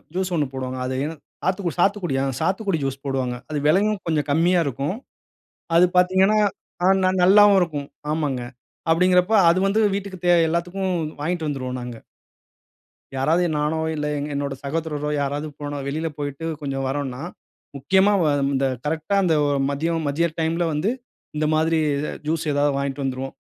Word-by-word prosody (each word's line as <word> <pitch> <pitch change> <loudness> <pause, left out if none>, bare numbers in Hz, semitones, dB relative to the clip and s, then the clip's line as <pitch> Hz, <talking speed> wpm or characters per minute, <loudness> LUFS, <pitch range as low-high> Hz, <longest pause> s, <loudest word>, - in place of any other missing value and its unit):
Juice 185 -1 -1
1 150 -2 +1
போடுவாங்க. 130 -1 -4
அது 130 0 -2
என் 160 +1 -5 0.3
சாத்துக்குடி 185 -2 -1
சாத்துக்குடியா, 175 -8 +1
ஆ - - -7
சாத்துக்குடி 190 +2 0
ஜூஸ் 135 0 -3
போடுவாங்க. 130 -2 -1
அது 155 - -2
விலையும் 200 +6 +3
கொஞ்சம் 155 -3 0
கம்மியா 175 +4 +3
இருக்கும். 140 - -2 0.8
அது 175 - +7
பார்த்தீங்கன்னா, 190 +4 +4 0.7
ந - - +4
நல்லாவும் 200 +1 +7
இருக்கும். 150 -5 -2 0.2
ஆமாங்க, 145 -5 -1 0.5
அப்டிங்கிறப்ப 180 +3 +3 0.2
அது 170 +2 +4
வந்து 200 +3 +2
வீட்டுக்கு 200 -2 -5
தேவ 175 - +6
எல்லாத்துக்கும் 180 +3 -1 0.3
வாங்கிட்டு 165 +1 -2
வந்துருவோம் 130 -3 -3
நாங்க. 120 -1 -7 1.2
யாராவது 160 +6 +2
நானோ 150 +2 0 0.2
இல்ல 150 -1 -3
எங் 145 +1 -3
என்னோட 140 -1 -2
சகோதரரோ 150 0 -3
யாராவது 145 +2 -2 0.4
வெளில 155 +4 -2
போயிட்டு 145 +2 -4 0.2
கொஞ்சம் 135 -2 -3
வறோன்னா, 135 -2 -3 0.6
முக்கியமா 190 +9 +3
வ - - +2 0.3
இந்த 135 +1 +1 0.2
கரெக்ட்டா 160 +6 -1
அந்த 165 -3 +3 0.3
மதியம் 160 +3 -1
மதிய 160 +4 +1
டைம்ல 165 +2 0
வந்து 150 +8 0 0.5
இந்த 155 0 0
மாதிரி 160 +1 +2 0.5
ஜூஸ் 160 +1 -1
ஏதாவது 145 0 +2
வாங்கிட்டு 140 0 -2
வந்துருவோம். 135 0 -3
160 Hz, 145 wpm, -23 LUFS, 140-180 Hz, 1.2 s, அது